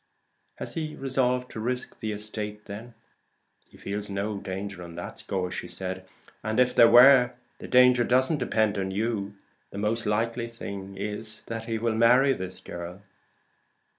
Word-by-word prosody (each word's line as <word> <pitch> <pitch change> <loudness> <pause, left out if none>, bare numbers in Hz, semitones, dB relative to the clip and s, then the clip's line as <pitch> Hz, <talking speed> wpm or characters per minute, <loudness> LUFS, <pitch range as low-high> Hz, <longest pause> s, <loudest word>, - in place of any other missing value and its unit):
"Has - - -6
he 155 -3 -4
resolved 125 -2 0
to - - -6
risk 125 +3 -3
the 110 - -3
estate 105 0 -5
then?" 110 +3 -9 0.7
"He - - -17
feels 105 +1 -5
in 100 - -5
no 100 +1 -2
danger 95 -1 -6
on 85 -1 -9
that 85 - -7
score. 90 -2 -3 0.9
And 110 +2 -1
if 125 0 +4
there 115 - +7
were, 125 0 +8 0.3
the - - -8
danger 125 -1 +6
doesn't 130 +6 +3
depend 110 -5 +1
on 95 0 -2
you. 100 0 -2 0.3
The - - -9
most 105 +2 -1
likely 115 +3 0
thing 100 -4 -8
is, 105 +2 -1
that 115 0 -5
he 115 -1 -2
will 115 0 0
marry 125 +5 +5
this 95 -5 -6
girl." 85 +3 -8
110 Hz, 160 wpm, -27 LUFS, 100-125 Hz, 0.9 s, were